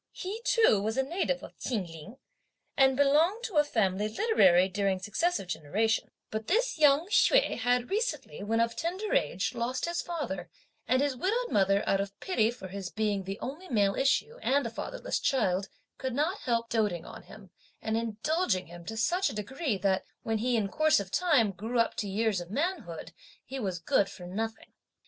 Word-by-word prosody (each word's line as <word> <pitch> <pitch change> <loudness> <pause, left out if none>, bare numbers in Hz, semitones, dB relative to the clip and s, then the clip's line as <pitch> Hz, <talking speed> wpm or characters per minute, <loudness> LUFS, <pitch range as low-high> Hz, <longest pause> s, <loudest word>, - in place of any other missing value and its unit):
He 405 +5 -5
too 440 - +4
was 220 +3 -2
a 265 - +3
native 380 - -1
of - - -12
Chin 220 -7 -2
Ling 165 +8 -11 0.6
and 265 -1 +4
belonged 315 +10 +3
to 420 -9 -3
a 295 - +7
family 210 -6 0
literary 195 - +4
during 195 0 0
successive 215 - -1
generations; 205 +8 0 0.2
but 220 0 -4
this 470 0 +1
young 295 +1 +5
Hsüeh - - +4
had 245 +3 +1
recently, 450 - -2
when 225 +3 0
of 230 0 +1
tender 370 +6 -3
age, 175 - 0
lost 245 +1 -2
his 340 0 -1
father, 240 - -4 0.4
and 255 +4 +3
his 285 -2 0
widowed 460 - -1
mother 195 0 +3
out 195 - +2
of 200 0 -7
pity 225 - +1
for 235 -5 -7
his 195 -1 -5
being 210 -3 -1
the 195 +2 -5
only 305 +8 -6
male 205 -5 +2
issue 450 - +1
and 280 0 +2
a 230 - -3
fatherless - - -3
child, 195 -7 +1 0.3
could 260 -2 -3
not 320 +8 0
help 230 -1 -1
doating 210 -7 0
on - - -10
him - - -14 0.3
and 220 - -2
indulging 225 - 0
him 170 +1 -11
to 220 +3 -6
such 355 - +1
a - - -7
degree, 245 +3 -2
that 190 0 +1 0.2
when 225 -1 -1
he, 245 +1 +1
in 210 -3 0
course 310 +8 +3
of 195 -1 -6
time, 290 - +3
grew 220 +6 -4
up 230 - +2
to 205 - -3
years 210 -1 0
of 175 - -9
manhood, 335 - -3 0.3
he 270 - -6
was 190 -6 -2
good 195 +4 +1
for 180 -2 -10
nothing. 220 +5 -5
230 Hz, 190 wpm, -29 LUFS, 195-310 Hz, 0.6 s, a